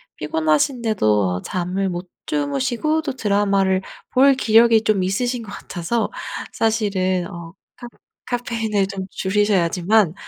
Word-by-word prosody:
피곤하신데도 150 - +1
잠을 185 +2 -2
못 175 0 -6 0.2
주무시고 240 - 0
또 285 -3 -3
드라마를 200 -4 +1 0.3
볼 275 +2 +6
기력이 225 -2 +4
좀 205 -2 +2
있으신 240 +6 -1
것 205 - -10
같아서 205 +6 -3 0.4
사실은 195 -5 0
어 170 -1 -9 0.2
카 240 - -9 0.4
카페인을 225 -5 -1
좀 195 -1 -5
줄이셔야지만 195 -1 +2
200 Hz, 270 characters per minute, -21 LUFS, 180-230 Hz, 0.4 s, 볼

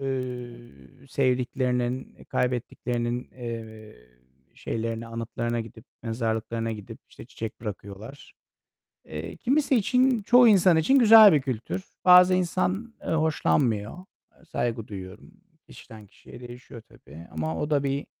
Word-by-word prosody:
Iıı, 125 - -7
sevdiklerinin, 125 -1 -1
kaybettiklerinin, 120 -1 -2
eee, 110 -3 -8 0.6
şeylerine, 115 0 -4
anıtlarına 115 +1 -3
gidip, 110 +1 -11 0.2
mezarlıklarına 115 0 -2
gidip, 105 -3 -9
işte, - - -13
çiçek 110 0 -8
bırakıyorlar. 105 +4 -9 0.7
Eee, 80 +2 -7
kimisi 275 +1 +1
için 250 +2 +2
çoğu 245 +2 +6
insan 185 -5 +5
için 265 - +4
güzel 220 -4 +9
bir 150 - +3
kültür. 130 - -4 0.2
Bazı 180 0 +8
insan, 185 +5 -1
eee, - - -5
hoşlanmıyor. 115 - 0 0.3
Eee, - - -25
saygı 115 -7 -3
duyuyorum. 95 - -10 0.4
Kişiden 110 -2 -13
kişiye 110 - -15
değişiyor 120 -1 -12
tabii 85 -6 -15
ama 80 0 -3
o 150 - -2
da 145 -2 +1
bir, 140 +1 -2
120 Hz, 120 wpm, -26 LUFS, 110-160 Hz, 0.7 s, güzel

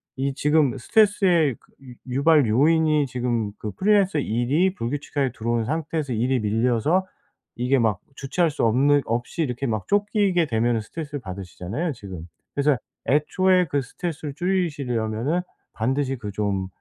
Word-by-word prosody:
이 135 +1 -1
지금 150 -2 +2
스트레스의 180 - +3
그 - - -29
유 125 -1 -11 0.2
유발 145 -3 +4
요인이 155 +5 +3
지금 120 -4 -2
그 105 - -5
프리랜서 195 - +2
일이 140 - +1
불규칙하게 140 0 -2
들어온 115 0 -1
상태에서 155 -1 -2
일이 125 +3 +1
밀려서 120 - +1 0.5
이게 125 +3 +1
막 110 -5 +1 0.2
주체할 160 +6 0
수 - - -2
없는 140 +6 +4
없이 120 +9 -2
이렇게 130 -1 -3
막 110 -4 -2
쫓기게 205 -4 +2
되면은 115 0 +1
스트레스를 145 +5 -6
받으시잖아요 95 - -5
지금. 95 -8 -9 0.3
그래서 145 -1 +2 0.3
애초에 180 +6 +3
그 140 -1 0
스트레스를 150 +2 -5
줄이시려면은 145 - -1 0.3
반드시 135 +4 -1
그 105 -3 -6
좀 100 -2 -1
135 Hz, 350 characters per minute, -24 LUFS, 115-160 Hz, 0.5 s, 유발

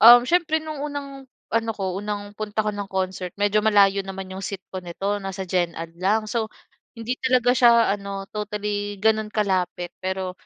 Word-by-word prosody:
um, 240 +1 +10
siyempre 330 +1 +2
nung 310 -2 -4
unang 280 -2 -6 0.2
ano 225 0 +1
ko 190 -1 -2
unang 205 0 -4
punta 215 0 -2
ko 210 - +1
ng 200 -1 -4
concert 185 -1 -2
medyo 205 +1 +3
malayo 200 -2 +5
naman 190 -1 -7
yung 190 - -6
seat 195 -1 -5
ko 185 - -3
nito, 195 +4 -3
nasa 195 0 -4
gen 175 -2 0
ad 165 0 -6
lang. 215 +4 +2
So, 220 0 -1 0.5
hindi 235 +3 -3
talaga 250 -2 +3
siya 235 -4 +5
ano 200 -1 -4
totally 210 -1 -3
gano'n 220 -1 +3
kalapit 185 -4 -1
pero 185 0 -2
205 Hz, 180 wpm, -24 LUFS, 190-225 Hz, 0.5 s, um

